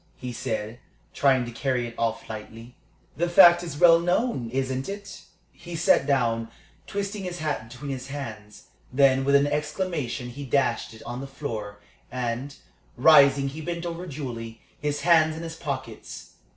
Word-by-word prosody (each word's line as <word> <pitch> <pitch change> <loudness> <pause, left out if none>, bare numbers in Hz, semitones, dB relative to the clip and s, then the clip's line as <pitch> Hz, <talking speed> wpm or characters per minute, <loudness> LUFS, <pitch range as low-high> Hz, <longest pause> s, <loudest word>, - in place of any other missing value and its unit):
he 125 -1 -6
said, 110 +1 -4 0.3
trying 130 -3 +3
to 120 - -7
carry 125 0 -1
it 115 - -7
off 115 -1 -2
lightly. 115 +2 -9 0.4
"The 170 +2 0
fact 175 -1 +8
is 165 -5 -6
well 165 0 +7
known, 175 - 0
isn't 130 +2 -2
it?" 200 -1 -7 0.3
He 175 0 -9
sat 160 -3 +3
down, 115 -5 +1 0.4
twisting 200 0 -3
his 180 -1 -4
hat 150 -8 -3
between 135 +4 -7
his 130 -1 -5
hands. 110 -7 -8 0.3
Then 135 0 +4
with 140 +1 +3
an 140 0 +5
exclamation 150 -4 -2
he 140 +4 -8
dashed 130 -4 0
it 110 - -13
on 120 +2 -6
the 135 - -6
floor, 110 -8 -6 0.3
and, 125 +3 -3 0.4
rising, 140 0 +6
he 155 +4 -8
bent 170 +2 -4
over 170 +1 -5
Julie, 120 -7 -6 0.2
his 145 0 -2
hands 160 -2 +4
in 165 - -6
his 165 -1 -6
pockets. 130 -8 -6
140 Hz, 165 wpm, -26 LUFS, 120-165 Hz, 0.4 s, fact